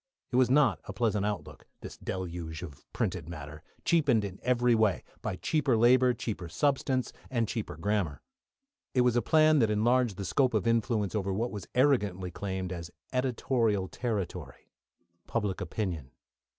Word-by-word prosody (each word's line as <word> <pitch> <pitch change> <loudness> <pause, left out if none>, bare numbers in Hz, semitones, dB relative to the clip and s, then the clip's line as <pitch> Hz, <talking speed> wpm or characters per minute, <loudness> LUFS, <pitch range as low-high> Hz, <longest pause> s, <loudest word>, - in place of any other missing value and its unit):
It - - -2
was 130 -1 +4
not 140 +1 +4
a - - -6
pleasant 105 -4 +1
outlook, 105 -3 -5
this - - -8
deluge 85 -3 -5
of 75 -4 -11
printed 90 -8 -2
matter, 75 -2 -8 0.2
cheapened 140 -11 +3
in 95 -1 -7
every 125 -1 +3
way, 110 -4 +2 0.2
by - - -2
cheaper 135 - +1
labour, 125 +2 +5
cheaper 105 -7 -4
substance, 130 - 0 0.2
and 115 -3 0
cheaper 110 0 -4
grammar. 100 -7 -1 0.7
It 125 - +5
was 125 -1 +3
a 120 - +3
plan 155 +1 +5
that 110 -4 +3
enlarged 115 0 +2
the 100 - -4
scope 125 +4 +2
of 105 - +1
influence 115 -3 +1
over 100 -3 -1
what 115 +6 -1
was 105 -3 -7
arrogantly 105 -9 +2
claimed 95 0 -4
as 85 -1 -6 0.2
editorial 120 -5 +1
territory 105 -5 -4 0.6
public 105 -4 -1
opinion. 85 - -3
110 Hz, 155 wpm, -30 LUFS, 95-125 Hz, 0.7 s, labour